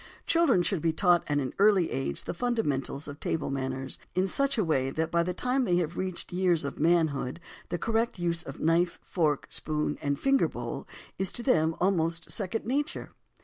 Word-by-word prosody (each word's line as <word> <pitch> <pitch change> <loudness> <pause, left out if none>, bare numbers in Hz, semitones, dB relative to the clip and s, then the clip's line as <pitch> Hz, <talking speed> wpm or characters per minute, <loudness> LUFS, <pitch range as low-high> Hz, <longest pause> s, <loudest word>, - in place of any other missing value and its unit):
Children 315 - +4
should 185 -3 0
be 165 0 +1
taught 175 -3 +4
at 145 - +1
an 130 -3 -1
early 200 -4 +4
age 135 - -2
the - - -4
fundamentals 155 - -1
of 145 0 -8
"table" 155 -3 -1
manners 130 0 -3 0.2
in 185 +1 +3
such 275 +8 0
a 215 - +3
way 135 -6 +1
that 160 +3 -2
by 170 - +3
the 175 +2 -1
time 250 +8 0
they 180 -7 +2
have 175 -1 0
reached 185 -2 -4
the 180 - -4
years 175 -5 +2
of 140 - -5
manhood 160 -5 +2 0.3
the 175 - -1
correct 225 +3 0
use 170 -1 0
of 135 - -8
knife, 170 +2 +2
fork, 155 -5 0
spoon 150 -1 -2
and 140 -1 0
fingerbowl 275 0 0 0.3
is 190 -1 +1
to 240 - -4
them 160 - +3
almost 165 -3 0
second 210 +2 -3
nature. 280 +5 -2
170 Hz, 190 wpm, -29 LUFS, 150-195 Hz, 0.3 s, Children